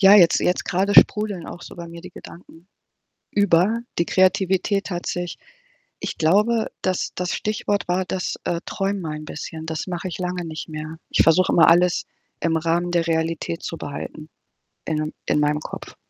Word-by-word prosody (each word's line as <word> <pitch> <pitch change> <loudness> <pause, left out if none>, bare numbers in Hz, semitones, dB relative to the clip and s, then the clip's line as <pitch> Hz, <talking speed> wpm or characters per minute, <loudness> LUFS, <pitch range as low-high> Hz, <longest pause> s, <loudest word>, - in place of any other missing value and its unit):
ja, 195 0 +8
jetzt 175 -5 +6
jetzt 180 - +1
grade 195 +3 +1
sprudeln 210 -5 +4
auch 175 - -9
so - - -10
bei 170 -1 -8
mir 170 0 -9
die 180 - -10
Gedanken 170 0 -14 0.6
über. 205 +3 +3 0.2
Die 170 - +3
Kreativität 190 +1 +2
hat 175 -1 -4
sich 175 -1 -3 0.6
ich - - -5
glaube, 210 +8 +3
das 185 -1 -1
das 180 0 -2
Stichwort 205 -3 -1
war 185 +1 +1
das, 185 0 -2
äh, 170 -1 -1
„träum 195 -1 -2
ein 155 0 -5
bisschen.“ 160 +2 -7
Das 160 -1 -3
mache 180 0 -4
ich 175 - -6
lange 180 -1 -3
nicht 160 -1 -6
mehr. 155 +1 -6
Ich - - +4
versuche 165 +3 +4
immer, 170 - +6
alles 175 +1 +4 0.4
im 165 -1 +1
Rahmen 170 +2 0
der 170 -1 +1
Realität 165 0 -1
zu 165 - -4
behalten 150 +2 -7 0.6
innen 155 -1 -2
in - - +2
meinem 150 0 +2
Kopf. - - -8
175 Hz, 175 wpm, -23 LUFS, 165-190 Hz, 0.6 s, ja